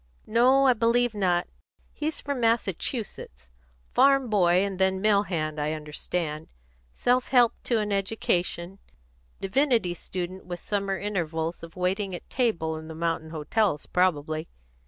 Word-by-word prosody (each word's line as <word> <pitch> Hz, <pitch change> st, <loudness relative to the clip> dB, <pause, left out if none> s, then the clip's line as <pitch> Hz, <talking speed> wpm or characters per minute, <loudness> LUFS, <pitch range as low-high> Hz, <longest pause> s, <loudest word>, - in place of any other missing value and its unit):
"No, 255 Hz, +4 st, +4 dB
I 260 Hz, -, +6 dB
believe 235 Hz, +1 st, +2 dB
not; 180 Hz, -4 st, +1 dB, 0.5 s
he's 305 Hz, +1 st, -3 dB
from 280 Hz, -2 st, -3 dB
Massachusetts. 205 Hz, -, -2 dB, 0.4 s
Farm 270 Hz, -2 st, +4 dB
boy 185 Hz, -2 st, +4 dB
and 195 Hz, -2 st, -5 dB
then 190 Hz, 0 st, +2 dB
mill 205 Hz, 0 st, +4 dB
hand, 155 Hz, -6 st, -3 dB
I 150 Hz, +1 st, 0 dB
understand. 155 Hz, +1 st, -4 dB, 0.4 s
Self 250 Hz, -, +1 dB
helped 245 Hz, -3 st, +3 dB
to 235 Hz, -, +2 dB
an 210 Hz, -1 st, -1 dB
education; 190 Hz, -2 st, -1 dB, 0.6 s
divinity 225 Hz, -2 st, +2 dB
student 180 Hz, +1 st, -6 dB
with 175 Hz, -1 st, -5 dB
summer 195 Hz, 0 st, -2 dB
intervals 170 Hz, -5 st, -2 dB
of 165 Hz, -1 st, -11 dB
waiting 185 Hz, +1 st, -1 dB
at -, -, -10 dB
table 170 Hz, -11 st, 0 dB
in 160 Hz, 0 st, -9 dB
the 160 Hz, -, -8 dB
mountain 165 Hz, -1 st, -2 dB
hotels 155 Hz, +2 st, 0 dB
probably. 155 Hz, -3 st, 0 dB
190 Hz, 135 wpm, -26 LUFS, 165-225 Hz, 0.6 s, I